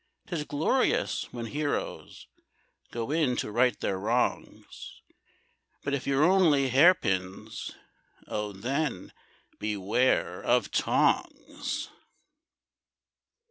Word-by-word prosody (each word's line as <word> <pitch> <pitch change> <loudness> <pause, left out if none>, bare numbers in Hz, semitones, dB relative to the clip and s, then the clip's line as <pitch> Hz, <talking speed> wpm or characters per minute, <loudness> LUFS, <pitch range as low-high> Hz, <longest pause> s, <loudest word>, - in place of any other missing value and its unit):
'Tis 170 -9 -3
glorious 160 - 0
when 120 -1 -5
heroes 145 +4 -4 0.6
Go 115 +2 -4
in 150 -6 +2
to 105 - -3
right 125 +3 +2
their 95 - -1
wrongs; 115 +5 -2 0.8
But 140 - -2
if 140 -2 -2
you're 140 +1 +3
only 160 -7 +4
hair 150 +9 +7
pins, 95 - -3 0.5
Oh, 105 -1 -3
then 125 +1 -3 0.5
beware 105 +4 0
of - - +1
tongs! - - 0
130 Hz, 95 wpm, -28 LUFS, 105-150 Hz, 0.8 s, hair